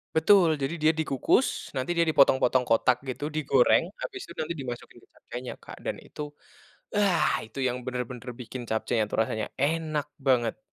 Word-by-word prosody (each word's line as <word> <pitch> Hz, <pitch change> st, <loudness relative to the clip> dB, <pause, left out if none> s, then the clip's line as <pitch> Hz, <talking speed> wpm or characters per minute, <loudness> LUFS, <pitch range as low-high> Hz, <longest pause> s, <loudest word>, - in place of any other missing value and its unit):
Betul. 160 Hz, -1 st, +5 dB
Jadi, 140 Hz, +3 st, -2 dB
dia 155 Hz, -, +5 dB
dikukus 160 Hz, -, +1 dB
nanti 130 Hz, +7 st, -1 dB
dia 170 Hz, -, +2 dB
dipotong-potong 130 Hz, -3 st, +4 dB
kotak 120 Hz, +2 st, +3 dB
gitu, 140 Hz, +3 st, -4 dB
digoreng 155 Hz, -, +3 dB, 0.2 s
habis 385 Hz, -6 st, -5 dB
itu -, -, -11 dB
nanti 155 Hz, +2 st, -3 dB
dimasukin 120 Hz, -3 st, -7 dB
ke -, -, -49 dB
capcaynya, 125 Hz, +1 st, -7 dB
Kak, -, -, -11 dB
dan -, -, -1 dB
itu, 150 Hz, 0 st, -8 dB, 0.7 s
ah, 195 Hz, -5 st, +3 dB
itu 110 Hz, +5 st, -11 dB
yang 125 Hz, -1 st, +1 dB
benar-benar 125 Hz, 0 st, -4 dB
bikin 125 Hz, 0 st, -7 dB
capcaynya 110 Hz, 0 st, 0 dB
itu -, -, -7 dB
rasanya 110 Hz, -1 st, -2 dB
enak 155 Hz, +1 st, 0 dB
banget. 125 Hz, -5 st, +1 dB
135 Hz, 160 wpm, -27 LUFS, 125-155 Hz, 0.7 s, Betul